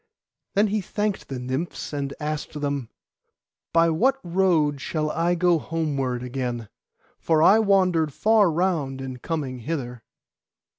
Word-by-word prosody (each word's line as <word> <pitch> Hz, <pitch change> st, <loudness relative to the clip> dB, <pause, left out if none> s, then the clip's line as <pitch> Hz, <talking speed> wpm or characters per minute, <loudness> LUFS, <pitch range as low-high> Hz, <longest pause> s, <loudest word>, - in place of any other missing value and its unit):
Then 205 Hz, +2 st, +5 dB
he 210 Hz, +1 st, 0 dB
thanked 205 Hz, +2 st, -2 dB
the 135 Hz, -, -4 dB
Nymphs, 130 Hz, +7 st, -4 dB
and 140 Hz, -1 st, -2 dB
asked 150 Hz, 0 st, -4 dB
them, 140 Hz, -5 st, -2 dB, 0.8 s
'By 165 Hz, 0 st, +4 dB
what 250 Hz, +12 st, +2 dB
road 170 Hz, -6 st, +2 dB
shall 155 Hz, +1 st, -2 dB
I 170 Hz, +2 st, +1 dB
go 175 Hz, -1 st, +3 dB
homeward 140 Hz, -7 st, -2 dB
again, 125 Hz, -3 st, -4 dB, 0.5 s
for 160 Hz, -1 st, +2 dB
I 205 Hz, +6 st, +7 dB
wandered 185 Hz, -7 st, +3 dB
far 215 Hz, +4 st, +4 dB
round 155 Hz, -6 st, 0 dB
in 130 Hz, -1 st, -6 dB
coming 135 Hz, -3 st, -4 dB
hither? 125 Hz, -3 st, -4 dB
155 Hz, 135 wpm, -24 LUFS, 135-175 Hz, 0.8 s, I